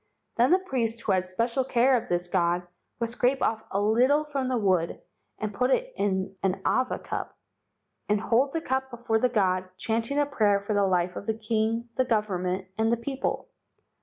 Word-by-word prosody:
"Then 240 +2 +4
the 365 - +6
priest 235 -11 -2
who 215 - -1
had 185 -1 +1
special 230 +7 0
care 255 +1 +3
of 235 -1 -2
this 175 0 0
god 175 0 +1 0.3
would 230 -1 -1
scrape 250 +2 +1
off 220 0 0
a 195 - -1
little 245 +8 +3
from 280 -3 -2
the 255 - +1
wood, 185 -6 +1 0.4
and 215 -1 -4
put 250 +5 +1
it - - +1
in 190 -1 -1
an 190 -1 0
awa 255 0 +1
cup, - - -6 0.7
and 210 0 +3
hold 245 +5 +2
the 330 - -1
cup 265 -3 -1
before 235 -2 -1
the 250 - +2
god, 185 -5 +1
chanting 230 +7 -1
a 290 - +3
prayer 215 -8 +2
for 200 +2 -3
the 200 -1 +3
life 180 -1 +1
of - - -7
the 220 -1 -1
king, 225 +1 -1
the 255 - +3
government, 190 -5 -1
and 225 +1 +2
the 235 - +2
people. 270 - -3
225 Hz, 195 wpm, -27 LUFS, 195-255 Hz, 0.7 s, the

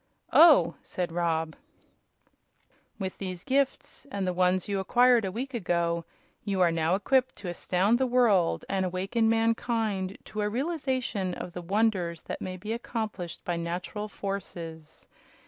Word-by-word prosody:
"Oh!" 325 -3 +7
said 180 -2 -4
Rob. 165 -2 -1 1.4
"With 190 -2 -5
these 185 -2 -5
gifts, 275 +1 -1
and 200 -4 -2
the 180 - 0
ones 180 +1 +2
you 200 -1 -1
acquired 240 +3 +4
a 190 - -2
week 260 +7 -5
ago, 170 -5 0 0.4
you 195 -2 -1
are 175 -2 +5
now 165 +2 +1
equipped 255 +6 +1
to 190 - -6
astound 190 +6 +1
the 260 - +2
world 230 -9 +3
and 195 -1 0
awaken 195 +5 0
mankind 225 -4 0
to 215 0 -4
a 210 - +1
realization 255 - -2
of 175 - -7
the 180 - -5
wonders 185 -3 0
that - - -6
may 185 0 -4
be 210 +5 -4
accomplished 220 -7 -5
by 175 -1 -1
natural 175 +5 -4
forces. 170 -6 -7
195 Hz, 145 wpm, -28 LUFS, 175-230 Hz, 1.4 s, Oh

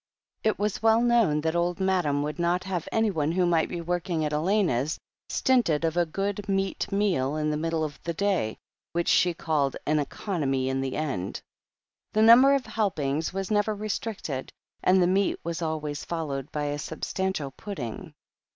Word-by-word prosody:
It 220 - +2
was 210 0 -1
well 225 0 +5
known 235 -11 +3
that 160 +1 -1
Old 175 +1 0
Madam 180 -7 +1
would 150 +4 -4
not 175 +1 +1
have 185 -4 -3
anyone 190 -9 +1
who 180 0 +2
might 170 -2 +2
be 175 - -4
working 175 -1 -1
at 150 - -2
Elena's 160 - +1 0.3
stinted 200 - +2
of 165 0 0
a 175 -1 +2
good 200 +4 -3
meat 195 +1 -1
meal 180 -9 +1
in 155 0 0
the - - 0
middle 165 0 -1
of 150 -2 -5
the 170 -1 -4
day, 190 - 0 0.4
which 170 0 0
she 175 -2 +4
called 145 -5 0
"an 150 +1 +2
economy 140 -4 -1
in 135 0 -1
the 135 -1 -3
end." 130 -12 -3 0.7
The 215 - +4
number 255 +5 +8
of 275 - -1
help 215 -4 -1
ings 145 +2 -1
was 195 +2 -4
never 210 0 +2
restricted, 205 - -4 0.3
and 185 +1 +4
the 180 - +4
meat 190 +2 +2
was 170 0 -3
always 155 -3 -3
followed 150 -4 -4
by 150 - -2
a 145 0 -2
substantial 160 -1 -3
pudding. 135 - -7
170 Hz, 180 wpm, -27 LUFS, 150-195 Hz, 0.7 s, number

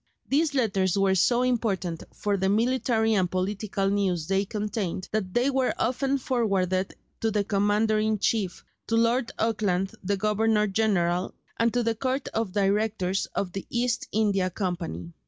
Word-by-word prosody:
These 295 +1 +1
letters 195 -7 +1
were 195 -1 +3
so 240 +6 +3
important 205 -9 -1
for 205 -1 -1
the 190 0 0
military 225 0 +2
and 185 -4 +2
political 195 +2 -1
news 195 -5 0
they 195 +3 +1
contained 205 -3 -3
that 195 -4 -2
they 250 +3 +3
were 265 -1 +1
often 265 +3 0
forwarded 195 -8 0 0.2
to 225 - +1
the 210 -1 +1
Commander 210 +2 +2
in 215 0 +1
chief, 200 -3 -1 0.2
to 225 - +1
Lord 230 +1 +2
Auckland, 200 -4 0
the 200 +2 0
Governor 215 +1 +2
general, 190 -4 0 0.2
and 230 0 +2
to 245 - +2
the 230 0 +1
Court 260 +4 -2
of 220 -4 -2
Directors 200 -1 0
of 190 -3 -1
the 195 +1 -6
East 245 +1 -1
India 200 -4 +1
Company. 170 - -4
210 Hz, 155 wpm, -26 LUFS, 190-230 Hz, 0.2 s, were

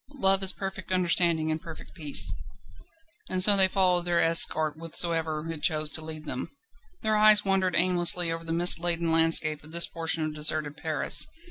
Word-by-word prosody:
Love 195 -7 +2
is 190 -1 +5
perfect 190 -1 -9
understanding 170 -3 0
and 155 0 -5
perfect 165 -3 -13
peace. 150 -5 +2 1.0
And 185 0 +1
so 205 +1 +7
they 190 -1 +4
followed 185 -2 0
their 175 -1 -1
escort 160 -2 +2
whithersoever 165 -1 -2
it 155 -2 -9
chose 155 -2 +1
to 160 - -2
lead 155 -1 -9
them. - - -7 0.5
Their 215 0 -1
eyes 215 -1 +4
wandered 190 -2 -1
aimlessly 175 -1 +1
over 165 0 -7
the 165 - -8
mist 170 +1 +4
laden 170 -1 -2
landscape 160 -2 +1
of 155 - -16
this 170 +1 +1
portion 165 -1 -4
of 155 - -6
deserted 150 -1 -1
Paris. 155 -2 -1
165 Hz, 175 wpm, -25 LUFS, 155-185 Hz, 1.0 s, so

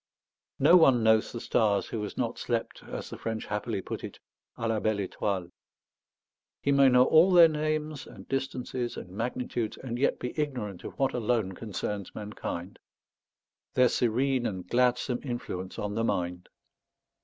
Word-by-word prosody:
No 155 +6 +7
one 130 -8 +5
knows 110 -1 +4
the 120 - -5
stars 105 -3 +2
who 110 - -4
has 105 - -6
not - - -2
slept, - - -2
as - - -6
the - - -7
French 110 -1 -3
happily 105 -2 -2
put - - -5
it, - - -7 0.4
à 115 - -2
la 110 -1 +1
belle 110 0 0
étoile. 95 -4 -2 1.1
He 140 - +2
may 140 -1 +6
know 125 0 +6
all 165 +7 +6
their 175 -2 +9
names 155 -1 -2
and - - -12
distances 130 -2 -3
and 90 - -8
magnitudes, 115 +1 -3
and 120 -2 -5
yet 140 - +2
be 125 - -5
ignorant 125 -11 -3
of - - -8
what 135 -1 +1
alone 115 -4 0
concerns 100 -1 -5
mankind, 100 -3 -6 1.0
their 125 -1 +5
serene 125 +2 +1
and 95 -3 -5
gladsome 125 +2 +2
influence 120 -8 -5
on 105 0 -3
the 115 +2 -1
mind. 90 -4 -2
120 Hz, 160 wpm, -29 LUFS, 105-130 Hz, 1.1 s, their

